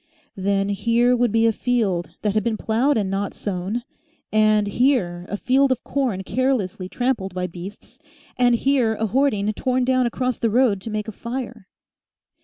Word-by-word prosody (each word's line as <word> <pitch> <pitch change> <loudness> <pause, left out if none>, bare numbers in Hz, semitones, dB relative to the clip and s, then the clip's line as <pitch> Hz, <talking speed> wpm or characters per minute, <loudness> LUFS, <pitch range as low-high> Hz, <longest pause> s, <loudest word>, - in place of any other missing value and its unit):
Then 195 +1 0
here 235 +5 +2
would 240 -2 +1
be 225 +1 +3
a 225 - +5
field 205 -9 0
that 210 -2 +1
had 215 -1 +1
been 225 -1 -1
ploughed 245 +7 +1
and 205 -3 0
not 195 +1 -2
sown, 200 +4 -3 0.5
and 215 -1 +4
here 200 -6 +1
a 205 - -3
field 265 +4 +2
of 255 - -1
corn 250 -9 -1
carelessly 205 -7 -1
trampled 230 -7 -2
by 180 0 -1
beasts, 180 +4 -10 0.4
and 245 -1 +3
here 245 -3 +2
a 220 - -1
hoarding 215 -3 +1
torn 255 +2 0
down 255 -1 +2
across 250 +1 -2
the 230 - +1
road 220 -4 +2
to 225 - -6
make 215 0 -3
a - - -4
fire. 235 -2 -6
225 Hz, 175 wpm, -22 LUFS, 200-250 Hz, 0.5 s, a